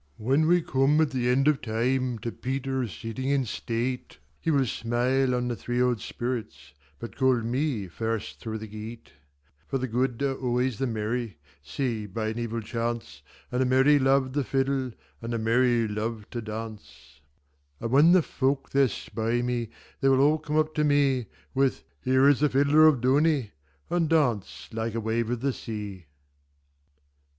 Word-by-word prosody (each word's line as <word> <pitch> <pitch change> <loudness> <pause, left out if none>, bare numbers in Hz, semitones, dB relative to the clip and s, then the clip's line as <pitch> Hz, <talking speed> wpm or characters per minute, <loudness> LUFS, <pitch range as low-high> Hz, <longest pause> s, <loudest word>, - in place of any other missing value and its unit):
When 135 +8 +2
we 175 0 +4
come 135 +3 +2
at 155 -2 +2
the 125 -2 0
end 135 +3 +3
of 150 -2 +3
time, 125 +2 0
To 115 - -2
Peter 130 0 -2
sitting 115 - -5
in 140 -2 +2
state, 120 +2 -3 0.2
He - - -2
will 140 -4 +3
smile 125 +3 0
on 125 0 -1
the 120 - -1
three 120 +1 -3
old 125 -3 +2
spirits, 120 - -5 0.2
But 115 - -8
call 130 -2 +3
me 120 -3 -1
first 110 +4 -4
through 110 -2 -4
the 110 - -7
gate; 110 +2 -9 0.6
For 135 - -1
the 130 0 -2
good 125 +2 -1
are 135 -1 +1
always 125 -2 -1
the 135 - 0
merry, 110 -3 -3 0.2
Save 105 - -3
by 110 -1 -1
an 110 +2 -4
evil 115 -1 -3
chance, 115 -9 -4 0.3
And 125 +1 0
the - - +3
merry 135 +3 +5
love 135 -1 +2
the 145 - +1
fiddleAnd 135 -1 -1 0.3
the 115 0 -3
merry 115 +1 +2
love 105 +1 -4
to 120 - -4
dance:And 75 - -10
when 145 +6 +6
the 185 -3 +5
folk 135 0 -1
there 140 -1 +4
spy 115 +1 -2
me, 120 -2 -2 0.3
They 135 - +3
will 135 0 +4
all 150 +3 +4
come 150 0 -2
up 155 0 +1
to 150 - +1
me, 140 -4 +2 0.3
With 135 -1 +1 0.2
'Here 130 +2 +4
is 145 -2 +5
the 150 0 +3
fiddler 145 +3 +5
of 140 -6 +3
Dooney!'And 130 - 0
dance 125 -11 0
like 115 0 -3
a - - 0
wave 110 +1 -1
of 120 -1 -2
the 135 0 0
sea. 105 -8 -7
125 Hz, 170 wpm, -27 LUFS, 110-135 Hz, 0.6 s, when